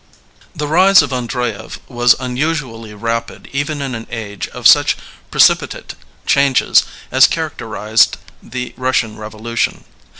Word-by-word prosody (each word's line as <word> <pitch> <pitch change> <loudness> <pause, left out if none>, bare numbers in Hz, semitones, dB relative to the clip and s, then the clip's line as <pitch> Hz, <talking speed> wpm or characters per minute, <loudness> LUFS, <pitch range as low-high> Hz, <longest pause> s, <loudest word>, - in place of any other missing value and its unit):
[IHE 150 - -2
rise 185 +3 +5
of 145 - -5
Andreyev 125 -3 -4
was 120 -2 +3
nnusnally 125 -5 -4
rapid 115 +1 -4
even 145 +1 -2
in 135 -2 -4
an 115 -1 -7
age 110 -4 -6
of - - -10
such - - +5 0.3
precipitate - - +2 0.3
changes 140 -2 +3 0.3
as - - +6
characterized 110 +2 0 0.2
the 125 -1 -6
Bnssian 125 -4 0
Revolotion. 110 +2 -3
125 Hz, 120 wpm, -16 LUFS, 115-140 Hz, 0.3 s, as